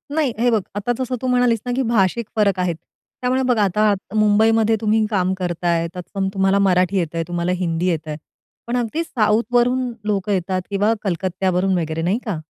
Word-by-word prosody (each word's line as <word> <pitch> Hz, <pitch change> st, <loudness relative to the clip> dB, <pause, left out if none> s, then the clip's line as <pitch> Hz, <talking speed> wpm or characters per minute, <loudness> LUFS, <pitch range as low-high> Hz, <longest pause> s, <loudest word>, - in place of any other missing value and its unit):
नाही, 300 Hz, -6 st, +1 dB
हे 245 Hz, +1 st, +3 dB
बघ 220 Hz, -3 st, +2 dB
आता 205 Hz, +4 st, -1 dB
जसं 255 Hz, -1 st, -2 dB
तू 260 Hz, -, -2 dB
म्हणालीस 245 Hz, -2 st, +2 dB
ना 245 Hz, -, -2 dB
की 265 Hz, -, +1 dB
भाषिक 230 Hz, 0 st, +1 dB
फरक 200 Hz, -4 st, +2 dB
आहेत, 180 Hz, -2 st, 0 dB, 0.5 s
त्यामुळे 255 Hz, +1 st, +1 dB
बघ 245 Hz, -2 st, +2 dB
आता 210 Hz, +1 st, +3 dB, 0.2 s
मुंबईमध्ये 220 Hz, +1 st, +3 dB
तुम्ही 215 Hz, 0 st, +2 dB
काम 190 Hz, -3 st, +1 dB
करताय, 175 Hz, -2 st, -1 dB
तत्सम 190 Hz, +2 st, -4 dB
तुम्हाला 195 Hz, 0 st, +2 dB
मराठी 185 Hz, 0 st, +2 dB
येतंय, 165 Hz, -2 st, -1 dB
तुम्हाला 175 Hz, 0 st, -1 dB
हिंदी 175 Hz, 0 st, -1 dB
येतंय 155 Hz, -3 st, -3 dB, 0.5 s
पण 245 Hz, -, -1 dB
अगदी 245 Hz, +7 st, -1 dB
साऊथवरून 245 Hz, +1 st, +1 dB
लोकं 205 Hz, -1 st, -1 dB
येतात 185 Hz, 0 st, -1 dB
किंवा 205 Hz, +1 st, 0 dB
वगैरे 225 Hz, -, +1 dB
कलकत्त्यावरून 185 Hz, +1 st, 0 dB, 0.3 s
नाही 185 Hz, +6 st, +1 dB
का. 210 Hz, -5 st, -2 dB
205 Hz, 175 wpm, -20 LUFS, 180-230 Hz, 0.5 s, हे